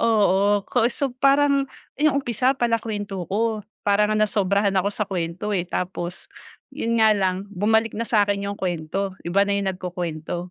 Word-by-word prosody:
oo. 205 Hz, -2 st, +3 dB
Ko 240 Hz, -1 st, +2 dB
so, 270 Hz, +1 st, -2 dB
parang, 275 Hz, 0 st, +3 dB, 0.3 s
yung 295 Hz, -2 st, +3 dB
umpisa 250 Hz, +3 st, +1 dB
pala 230 Hz, -2 st, +1 dB
kwento 205 Hz, -5 st, -5 dB
ako, 220 Hz, +2 st, 0 dB, 0.2 s
para 205 Hz, +1 st, +3 dB
ngang 215 Hz, 0 st, +3 dB
nasobrahan 200 Hz, -1 st, +1 dB
ako 190 Hz, +2 st, +2 dB
sa 210 Hz, +1 st, -1 dB
kwento, 185 Hz, +2 st, -3 dB
eh. 180 Hz, -3 st, -1 dB
Tapos, 180 Hz, 0 st, -4 dB, 0.5 s
yun 230 Hz, -5 st, -1 dB
nga 220 Hz, -1 st, +6 dB
lang 190 Hz, -1 st, 0 dB
bumalik 220 Hz, +3 st, +2 dB
na 225 Hz, -, -2 dB
sa 210 Hz, -2 st, +4 dB
'kin 200 Hz, 0 st, -1 dB
yung 200 Hz, -, -6 dB
kwento 185 Hz, +2 st, -2 dB
iba 195 Hz, +4 st, +2 dB
na 200 Hz, -, 0 dB
yung 200 Hz, -1 st, 0 dB
nagkukuwento, 175 Hz, -2 st, -5 dB
205 Hz, 170 wpm, -23 LUFS, 185-225 Hz, 0.5 s, nga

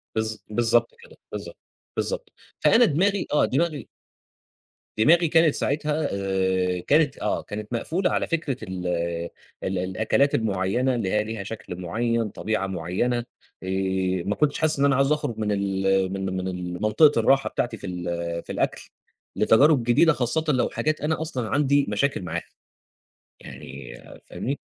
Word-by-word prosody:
بالض 110 Hz, 0 st, -1 dB
بالضبط 120 Hz, -, +2 dB
كده، -, -, -16 dB
بالضبط، -, -, -7 dB, 0.4 s
بالضبط، -, -, -2 dB, 0.3 s
فأنا 235 Hz, +1 st, +5 dB
دماغي 195 Hz, +4 st, +1 dB
آه 150 Hz, -, +4 dB
دماغي 150 Hz, -1 st, -1 dB, 1.1 s
دماغي 165 Hz, +9 st, +5 dB
كانت 160 Hz, -1 st, +4 dB
ساعتها 150 Hz, +2 st, 0 dB
آآ 95 Hz, -2 st, 0 dB
كانت 145 Hz, -1 st, +3 dB
آه -, -, -1 dB
كانت 105 Hz, +2 st, -7 dB
مقفولة 170 Hz, +10 st, 0 dB
على -, -, 0 dB
فكرة 155 Hz, -6 st, -1 dB
ال 95 Hz, -3 st, -5 dB, 0.8 s
ال 95 Hz, 0 st, -1 dB
الأكلات 110 Hz, +10 st, +1 dB
المعيّنة 110 Hz, +4 st, 0 dB
اللي 105 Hz, -6 st, -2 dB
هي 105 Hz, 0 st, +2 dB
ليها 110 Hz, -2 st, -5 dB
شكل 105 Hz, -3 st, -7 dB
معيّن، 115 Hz, +4 st, -1 dB
طبيعة 110 Hz, -1 st, -2 dB
معيّنة، 95 Hz, +7 st, -1 dB, 0.5 s
آآ، 95 Hz, -1 st, -1 dB
ما 105 Hz, -, 0 dB
كنتش 150 Hz, -1 st, +1 dB
حاسس 155 Hz, -3 st, +2 dB
إن 140 Hz, -, +4 dB
أنا 140 Hz, -, +4 dB
عايز 135 Hz, +2 st, +2 dB
أخرج 120 Hz, -7 st, -1 dB
من 105 Hz, -1 st, -1 dB
ال 95 Hz, -1 st, +1 dB
من 95 Hz, 0 st, -3 dB
من 95 Hz, 0 st, -3 dB
ال 90 Hz, 0 st, -5 dB
منطقة 115 Hz, +6 st, +4 dB
الراحة 135 Hz, +4 st, +3 dB
بتاعتي 120 Hz, -2 st, -2 dB
في 100 Hz, -, -7 dB
ال 85 Hz, -1 st, -4 dB
في -, -, -8 dB
الأكل، -, -, -2 dB, 0.5 s
لتجارب 140 Hz, +3 st, +4 dB
جديدة 125 Hz, +8 st, +4 dB
خاصةً 135 Hz, +5 st, 0 dB
لو 125 Hz, -, +1 dB
حاجات 155 Hz, 0 st, -1 dB
أنا 155 Hz, +1 st, -1 dB
أصلًا 130 Hz, -9 st, -3 dB
عندي 140 Hz, 0 st, +2 dB
مشاكل 140 Hz, -5 st, 0 dB
معاها 85 Hz, -1 st, -4 dB, 1.0 s
يعني 65 Hz, -2 st, -10 dB, 0.4 s
فاهمني. 140 Hz, +3 st, -4 dB
115 Hz, 150 wpm, -24 LUFS, 95-145 Hz, 1.1 s, فأنا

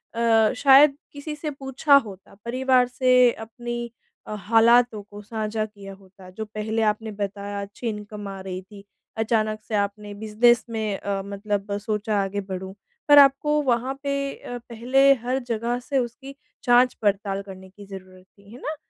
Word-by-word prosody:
अ, 225 Hz, -1 st, +3 dB
शायद 275 Hz, +1 st, +6 dB, 0.2 s
किसी 295 Hz, +1 st, -6 dB
से 300 Hz, +1 st, -5 dB
पूछा 275 Hz, +1 st, +2 dB
होता, 195 Hz, -3 st, -12 dB
परिवार 255 Hz, +1 st, +2 dB
से 250 Hz, -1 st, +4 dB
अपनी 240 Hz, +1 st, -6 dB, 0.4 s
अ, -, -, -5 dB
हालातों 230 Hz, +2 st, +4 dB
को 205 Hz, +1 st, -12 dB
साझा 215 Hz, 0 st, -3 dB
किया 200 Hz, -2 st, -11 dB
होता। 190 Hz, -1 st, -16 dB
जो 220 Hz, +4 st, -6 dB
पहले 215 Hz, +1 st, -3 dB
आपने 220 Hz, +1 st, -1 dB
बताया, 200 Hz, 0 st, -5 dB
अच्छी 200 Hz, +4 st, -7 dB
इनकम 210 Hz, -1 st, -7 dB
आ 195 Hz, -1 st, -7 dB
रही 185 Hz, -1 st, -6 dB
थी। 200 Hz, +1 st, -15 dB, 0.3 s
अचानक 215 Hz, -1 st, 0 dB
से 220 Hz, -, -2 dB
आपने 205 Hz, 0 st, -2 dB
बिज़नेस 220 Hz, +3 st, +2 dB
में 220 Hz, -3 st, -2 dB
अ, 200 Hz, -1 st, -3 dB
मतलब 200 Hz, 0 st, -3 dB
सोचा 210 Hz, 0 st, -2 dB
आगे 200 Hz, +1 st, -3 dB
बढ़ूँ। 190 Hz, -1 st, -7 dB, 0.3 s
पर 290 Hz, -1 st, +7 dB
आपको 285 Hz, +2 st, +4 dB
वहाँ 255 Hz, 0 st, 0 dB
पे 280 Hz, 0 st, -1 dB, 0.2 s
अ, 245 Hz, -, -8 dB
पहले 260 Hz, +4 st, +4 dB
हर 255 Hz, +2 st, -1 dB
जगह 235 Hz, +1 st, -2 dB
से 275 Hz, +2 st, -3 dB
उसकी 265 Hz, +3 st, -6 dB, 0.3 s
जाँच-पड़ताल 210 Hz, -5 st, +2 dB
करने 190 Hz, -1 st, -12 dB
की 200 Hz, +2 st, -14 dB
ज़रूरत 185 Hz, -1 st, -12 dB
थी। 200 Hz, +1 st, -21 dB
है 245 Hz, -, -11 dB
ना? 310 Hz, -, -4 dB
220 Hz, 160 wpm, -24 LUFS, 200-245 Hz, 0.4 s, पर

